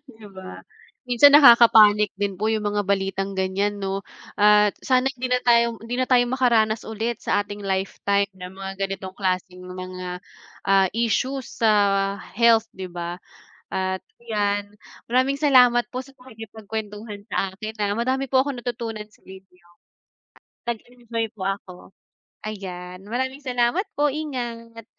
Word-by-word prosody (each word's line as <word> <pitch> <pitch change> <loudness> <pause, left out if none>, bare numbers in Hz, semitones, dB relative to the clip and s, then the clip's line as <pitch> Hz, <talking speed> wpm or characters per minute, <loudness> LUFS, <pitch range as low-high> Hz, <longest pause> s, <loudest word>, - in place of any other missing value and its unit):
'Di 220 -6 -14
ba. 190 -1 -10 0.5
Minsan 250 +4 +6
nakaka-panic 225 -6 +7
din 200 -2 -1
po 215 +3 0
'yung 215 - 0
mga 205 0 -1
balitang 195 0 -1
ganyan 195 +2 -1
'no 195 0 -3 0.3
at 210 0 +4
sana 260 0 +3
hindi 250 0 -3
na 250 - +3
tayo 235 -2 +3
hindi 235 +2 -5
na 255 - +1
tayo 245 -1 +3
makaranas 230 -4 +2
ulit 225 +1 -4
sa - - +2
ating 205 0 -7
lifetime 195 +1 0
ng 180 0 -9
mga 195 0 -7
ganitong 190 -1 -6
klaseng 185 -1 -2
mga, 185 0 -7 0.5
ah, 195 -1 +5
issues 240 +4 -1 0.2
sa 220 - +6 0.7
health 230 -1 +4
'di 185 -2 -7
ba, 175 0 -5 0.5
at 190 0 -2 0.2
'yan 205 -2 -1 0.3
maraming 260 +3 +1
salamat 250 -4 +5
po 255 - -3
sa 275 - -17
pakikipagkwentuhan 220 -3 -8
sa 190 0 -1
akin, 215 +3 -7
ah. 205 -1 0
Madami 260 +5 -1
po 260 0 +3
akong 275 -2 -3
natutunan 230 -3 -5
sa - - -25
inyo. 190 -2 -16 1.0
Nag-enjoy 235 -1 -4
po 195 -4 -4
ako. 195 -2 -5 0.7
Ayan 180 -3 -7
maraming 260 +4 -3
salamat 250 - +1
po! 295 0 +3
Ingat! 235 -6 -6
215 Hz, 140 wpm, -23 LUFS, 195-240 Hz, 1.0 s, nakaka-panic